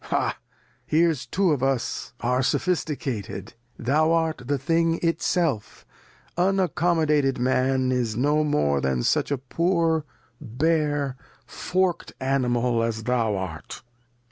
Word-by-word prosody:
Ha! - - 0 0.5
here's 155 -5 +2
two 185 +6 +1
of 145 -4 0
us 135 -3 -1
are 125 +2 +1
Sophisticated; 130 - -2 0.2
thou 150 +7 +2
art 160 -3 +1
the 145 0 +1
Thing 165 +4 +1
itself, 165 - -1 0.5
unaccomodated 170 -6 +2
Man 130 +1 +1
is 120 -4 -1
no 145 +4 +2
more 75 - +1
than 65 -2 0
such - - +1
a 140 - 0
poor 165 +3 0 0.4
bare 145 +1 0 0.3
fork'd 185 -1 -1
Animal 125 -3 +1
as 115 -1 -2
thou 115 -3 +1
art. 95 -5 -6
135 Hz, 115 wpm, -24 LUFS, 120-165 Hz, 0.5 s, here's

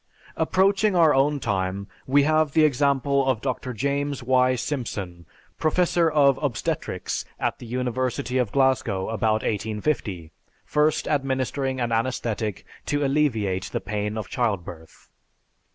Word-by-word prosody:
Approaching 195 +1 +2
our 165 -3 +5
own 145 +2 +2
time, 100 -3 -2 0.2
we 140 +2 +4
have 155 -1 +2
the 155 -1 +5
example 140 -1 +2
of 130 -4 +2
Dr. 130 0 -3
James 140 +3 -2
Y. 130 0 +3
Simpson, 100 - -4 0.3
professor 170 +1 +2
of 140 -3 +4
obstetrics 145 - -2 0.2
at - - -1
the 120 - -9
University 125 +1 -1
of 120 -5 0
Glasgow 130 -8 +1
about 110 -1 0
1850, 105 - -2 0.3
first 150 0 +1
administering 135 -1 -1
an 120 -1 -1
anesthetic 115 -3 -2 0.2
to 145 0 0
alleviate 115 -10 +1
the - - -3
pain 105 +2 -3
of 110 -4 -4
childbirth. 90 -9 -4
130 Hz, 125 wpm, -24 LUFS, 110-145 Hz, 0.3 s, our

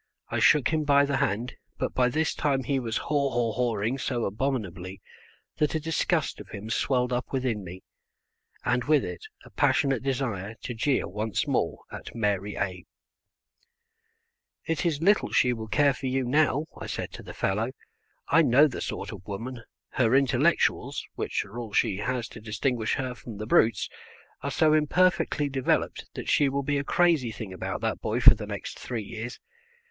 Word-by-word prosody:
I - - -1
shook 150 -5 +5
him 155 -1 +1
by 140 -1 +5
the 140 -1 0
hand, 115 +5 -1 0.2
but - - -2
by 125 -1 +3
this 155 +5 0
time 135 -3 0
he 135 +2 0
was 115 -3 -2
haw 140 -2 0
haw 120 -3 0
hawing 115 +1 -1
so 120 -2 -1
abominably 95 -5 -3 0.6
that 150 +1 +1
a - - +1
disgust 160 +1 0
of - - -10
him 105 +3 -7
swelled 125 0 +1
up 125 +1 -2
within 125 -6 -1
me, 90 +1 -9 0.8
and 125 0 +1
with 150 -2 +3
it 90 -1 -6 0.2
a - - -15
passionate 135 -4 +2
desire 120 -6 -2
to 125 - -4
jeer 130 +4 +1
once 105 +3 -2
more - - 0
at - - -8
Mary 105 -2 -1
A 90 -3 -3 1.8
"It 165 +2 0
is 160 -1 -1
little 205 +3 +3
she 125 -1 +3
will 110 -2 -6
care 140 +4 +3
for 130 +1 -5
you 130 +1 0
now," 145 +3 +2
I - - -7
said - - -4
to - - -9
the - - -10
fellow; 105 +5 0 0.6
"I 165 - +5
know 145 +1 +6
the 135 - -6
sort - - -4
of 95 -4 -10
woman; 120 +5 -5 0.3
her 125 -1 +2
intellectuals 135 -1 +2
(which - - -2
are 110 +5 -8
all 115 -4 -7
she 105 -5 +2
has 120 +3 -2
to 110 - -11
distinguish 110 +1 -1
her 130 -2 -3
from 115 -3 -10
the 110 - -5
brutes) 110 -1 +3 0.5
are 140 - -2
so 155 +2 +3
imperfectly 160 0 +2
developed 135 -2 0
that - - -6
she 145 -2 +4
will 140 +1 -1
be 145 +1 0
a - - -2
crazy 160 -7 +2
thing 105 -3 -7
about 90 - -4
that - - -2
boy - - -1
for - - +9
the - - -7
next - - -6
three 120 -4 -4
years. 115 +4 -7
125 Hz, 185 wpm, -27 LUFS, 110-140 Hz, 1.8 s, for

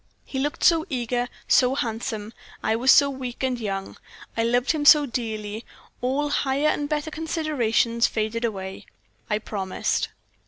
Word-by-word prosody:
"He 265 - -4
looked 290 +2 -2
so 330 -2 +5
eager, 245 -2 -1 0.2
so 255 +1 +4
handsome; 225 -3 -3 0.3
I 220 - +2
was 255 +3 +4
so 280 - +7
weak 260 -2 -6
and 255 -2 0
young. 195 -3 -4 0.4
I 230 - +1
loved 245 +3 +2
him 310 -3 -1
so 295 0 +8
dearly, 220 -3 -4 0.4
all 275 +4 0
higher 285 +1 +1
and 290 -1 -1
better 300 0 -2
considerations 285 -8 +1
faded 220 +1 -2
away 190 -4 -4 0.4
I 210 - +2
promised." 195 -3 -2
245 Hz, 150 wpm, -24 LUFS, 220-285 Hz, 0.4 s, so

